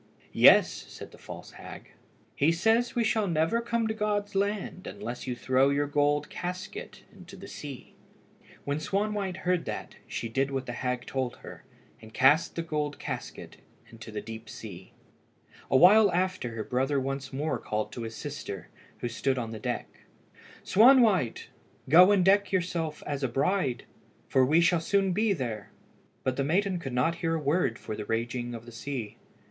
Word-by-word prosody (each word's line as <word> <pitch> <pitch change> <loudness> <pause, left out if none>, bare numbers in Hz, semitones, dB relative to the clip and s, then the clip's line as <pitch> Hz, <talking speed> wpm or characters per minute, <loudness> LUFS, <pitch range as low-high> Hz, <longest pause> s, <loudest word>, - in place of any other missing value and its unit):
"Yes," - - +7
said - - -10
the - - -16
false - - -10
hag; - - -11 0.4
"he 145 +4 +3
says 225 +8 +2
we 240 - +2
shall 220 -2 +1
never 165 +7 +1
come 235 -1 -1
to 220 - -1
God's 210 -1 -1
land 200 -1 -2
unless 120 +2 -6
you 125 - -2
throw 130 +2 +2
your 145 +1 +1
gold 145 0 +1
casket 180 +1 -6
into 185 0 -13
the 195 +1 -10
sea." 145 -8 -9 0.7
When 140 +1 -1
Swanwhite 200 +2 -1
heard 180 -1 +1
that, - - -6
she - - -4
did 135 +4 0
what 135 -1 -3
the - - -5
hag 125 0 -3
told 130 -2 -2
her, - - -12 0.4
and 110 0 -13
cast 145 +5 +4
the 165 - -2
gold 150 -3 -2
casket - - -7 0.3
into 115 -1 -10
the 105 - -4
deep 110 0 -9
sea. 95 -5 -10 0.8
A 130 - +5
while 200 +5 +7
after 180 -9 -1
her 110 - -3
brother 135 +4 0
once 135 0 -4
more 135 -2 -2
called 105 0 -3
to 120 - -6
his 115 -1 -6
sister, 140 - -6 0.3
who - - -1
stood 130 +3 -1
on 115 -3 -3
the 110 - -6
deck - - -3 0.8
"Swanwhite, 220 - +4 0.4
go 180 +6 +8
and 190 -3 +3
deck 200 +1 +4
yourself 170 -4 -2
as 145 -1 -3
a - - +2
bride, 135 +1 0 0.4
for 130 - +3
we 155 +6 +4
shall 170 -1 +3
soon 195 +2 +1
be 215 +3 +2
there." 120 - -3 0.5
But 130 -1 -1
the 140 - +1
maiden 185 +5 +1
could 135 -5 -6
not 145 +7 +1
hear 165 -1 +1
a - - -1
word 145 -4 +1
for 110 - -6
the 105 - -6
raging 120 +2 -2
of 115 0 -9
the 120 - -11
sea. 115 -2 -6
145 Hz, 175 wpm, -28 LUFS, 125-185 Hz, 0.8 s, go